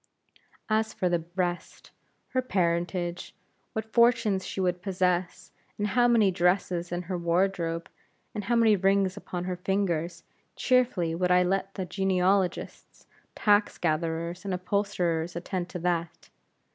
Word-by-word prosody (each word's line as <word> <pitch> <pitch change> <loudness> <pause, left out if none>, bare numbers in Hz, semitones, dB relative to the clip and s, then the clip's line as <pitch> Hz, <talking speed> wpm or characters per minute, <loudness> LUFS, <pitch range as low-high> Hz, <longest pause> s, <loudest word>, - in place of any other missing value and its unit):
And 220 0 +3
for 205 -4 -2
the 170 -2 0
rest; 175 -2 -3 0.4
her 255 - 0
parentage, 175 -4 -1 0.4
what 220 0 -5
fortune 235 -4 +4
she 190 - -6
would 180 -1 0
possess, 180 -1 -1 0.3
how 240 +4 +3
many 225 -5 +4
dresses 180 -1 0
in 175 0 -2
her 180 0 -4
wardrobe, 170 -1 0 0.5
and 210 -2 -4
how 240 - +1
many 225 -2 +5
rings 195 0 +2
upon 180 -3 -5
her 180 0 -3
fingers; 180 -3 -1 0.3
cheerfully 240 -10 +2
would 180 +2 0
I 180 0 +5
let 195 +2 -1
the 190 - -3
genealogists, 190 0 -1 0.3
tax 205 0 +3
gatherers, 165 +2 -2
and 195 -2 -2
upholsterers 180 -3 -1
attend 175 +1 -4
to 180 - -5
that. 170 -1 -2
180 Hz, 135 wpm, -27 LUFS, 175-200 Hz, 0.5 s, many